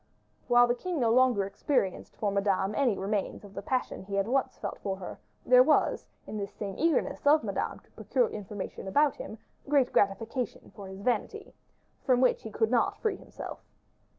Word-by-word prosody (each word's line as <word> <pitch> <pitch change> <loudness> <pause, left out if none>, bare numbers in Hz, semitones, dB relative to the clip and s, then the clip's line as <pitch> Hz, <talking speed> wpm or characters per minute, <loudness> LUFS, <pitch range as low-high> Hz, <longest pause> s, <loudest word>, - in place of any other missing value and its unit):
While 245 0 +6
the 240 - +1
king 340 +6 -3
no 230 -3 +3
longer 245 -5 +4
experienced 195 -1 -1
for 205 -2 0
Madame 200 0 +1
any 245 -4 +1
remains 200 +1 -2
of 200 - -13
the - - -5
passion 260 -4 -2
he 195 +1 -6
had 195 +1 +1
once 265 +3 0
felt - - -5
for 195 -1 -2
her, 185 - -8 0.3
there - - +7
was, - - +2 0.2
in 215 - -6
this 200 -1 -4
same 200 -2 -5
eagerness 320 -2 +1
of 300 +1 +6
Madame - - -2
to - - -29
procure - - 0
information 205 - -7
about 285 +7 +3
him, 220 - -7 0.3
great 280 -4 +3
gratification 220 +4 -1
for 200 -2 -9
his 190 +1 -9
vanity, 250 - -2 0.5
from 255 -3 +3
which 255 -1 +3
he 220 - -7
could 220 +1 0
not 240 -2 +2
free 440 -3 -1
himself. - - -9
225 Hz, 185 wpm, -29 LUFS, 200-265 Hz, 0.5 s, there